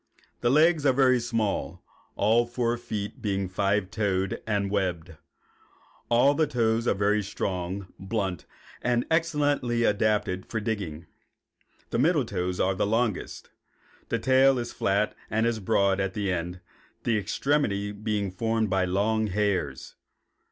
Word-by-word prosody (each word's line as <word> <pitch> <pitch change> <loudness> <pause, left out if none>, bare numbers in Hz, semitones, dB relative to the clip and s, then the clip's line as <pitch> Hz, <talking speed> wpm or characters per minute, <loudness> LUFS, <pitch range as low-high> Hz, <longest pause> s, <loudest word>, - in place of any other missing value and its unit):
The 120 - +1
legs 155 +3 +4
are 135 -2 +4
very 130 -1 +4
small, 115 -3 -2 0.3
all 115 +3 +3
four 120 0 0
feet 110 -4 -5
being 100 -2 -1
five 100 +1 0
toed 100 -3 -1
and 100 -2 0
webbed. 90 -4 -2 0.9
All 125 +4 +5
the 155 +1 +1
toes 115 -3 +1
are - - +3
very 105 +2 +2
strong, 95 -1 -3
blunt, 95 -3 -3 0.3
and 120 -1 +1
excellently 145 -7 +1
adapted 105 -3 +1
for 115 - -2
digging. 100 -7 -4 0.9
The - - 0
middle 150 -1 +3
toes 90 -3 -3
are 95 - +2
the 95 - 0
longest. 110 -1 -2 0.6
The - - +1
tail 130 0 +4
is 120 -1 -4
flat 100 +2 0
and 110 +1 +1
is 115 -1 0
broad 100 -1 +2
at 95 -1 -2
the 100 -3 -1
end, 90 +1 -4 0.4
the 115 - +1
extremity 105 -4 0
being 105 -2 -2
formed 110 +2 -1
by 95 -1 +2
long 110 +4 +1
hairs. 95 -9 -1
105 Hz, 140 wpm, -27 LUFS, 95-120 Hz, 0.9 s, All